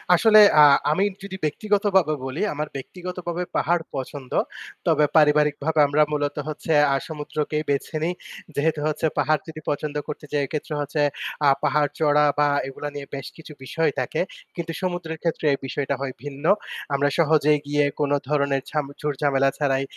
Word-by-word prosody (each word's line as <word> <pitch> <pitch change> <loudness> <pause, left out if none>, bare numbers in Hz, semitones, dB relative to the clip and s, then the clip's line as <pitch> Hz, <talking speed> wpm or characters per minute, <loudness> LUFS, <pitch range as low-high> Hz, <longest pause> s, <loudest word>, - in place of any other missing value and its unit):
আসলে 215 +3 +6 0.2
আ - - +10 0.3
আমি 185 +6 +2 0.2
যদি 195 -1 -6
ব্যক্তিগতভাবে 195 -1 +1
বলি, 135 +4 -4
আমার 150 +1 -3
ব্যক্তিগত 180 +7 -7
ভাবে 175 +1 -1
পাহাড় 170 0 +1
পছন্দ। 135 0 -6 0.6
তবে 150 - +4
পারিবারিক 150 -1 +4
ভাবে 160 0 +1
আমরা 145 +2 +2
মূলত 145 -1 -1
হচ্ছে 155 +1 -4 0.2
আ - - +2
সমুদ্রকেই 150 0 -3
বেছে 140 +2 -1
নিই। 175 +2 0 0.4
যেহেতু 155 +2 +1
হচ্ছে 155 +1 -1
পাহাড় 155 -2 +2
যদি 155 -1 -8
পছন্দ 150 0 -2
করতে 150 0 -6
যাই 145 - +1
এক্ষেত্রে 150 +1 -4
হচ্ছে 145 +1 -2 0.4
আ - - +6 0.2
পাহাড় 150 0 +2
চড়া 150 -1 +4
বা 145 - +4 0.2
এগুলা 135 +2 -6
নিয়ে 140 -1 -5
বেশ 135 -2 -6
কিছু 160 -1 -11
বিষয় 160 +3 0
থাকে। 130 +5 -1 0.3
কিন্তু 170 -1 -4
সমুদ্রের 175 -3 -3
ক্ষেত্রে 165 -2 -1
এই 140 - -2
বিষয়টা 140 +1 -2
হয় 135 -2 -3
ভিন্ন। 145 +1 -7 0.5
আমরা 140 +1 +2
সহজেই 150 -2 +4
গিয়ে 145 0 +2 0.2
কোন 145 -1 0 0.2
ধরণের 140 -2 +1
ঝাম 150 -2 -1
ঝুর-ঝামেলা 140 -2 +1
ছাড়াই 135 -2 +1
150 Hz, 165 wpm, -23 LUFS, 145-160 Hz, 0.6 s, আ